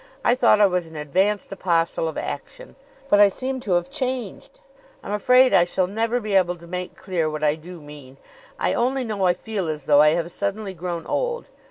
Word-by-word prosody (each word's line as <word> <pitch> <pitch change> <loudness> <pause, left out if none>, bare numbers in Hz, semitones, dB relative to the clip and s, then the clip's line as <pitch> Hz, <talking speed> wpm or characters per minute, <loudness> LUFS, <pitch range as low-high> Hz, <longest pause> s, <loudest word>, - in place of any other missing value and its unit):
I - - +5
thought 245 -4 +4
I 210 - +7
was 180 -3 0
an 160 - -13
advanced 190 +9 0
apostle 170 -4 0
of 160 - -5
action; - - -7 0.3
but 205 - +4
I 205 -1 +7
seem 260 +6 -4
to 205 -7 -2
have 175 0 +1
changed. 260 - -4 0.4
I'm - - -6
afraid 250 +4 +4
I 175 - +6
shall 180 +1 0
never 225 +5 -1
be 215 -3 -4
able 180 -2 +3
to 170 0 -15
make 180 +1 -6
clear 170 -4 -2
what 155 0 -5
I 150 -1 +3
do 170 +3 -10
mean. 145 -3 -13 0.4
I - - 0
only 255 +2 0
know 205 -5 -1
I 175 - +4
feel 200 -2 -4
as 150 -3 -4
though 145 0 +5
I 150 +1 +5
have 170 0 -3
suddenly 200 +1 -3
grown 170 -1 -5
old. - - -2
185 Hz, 210 wpm, -23 LUFS, 165-220 Hz, 0.4 s, I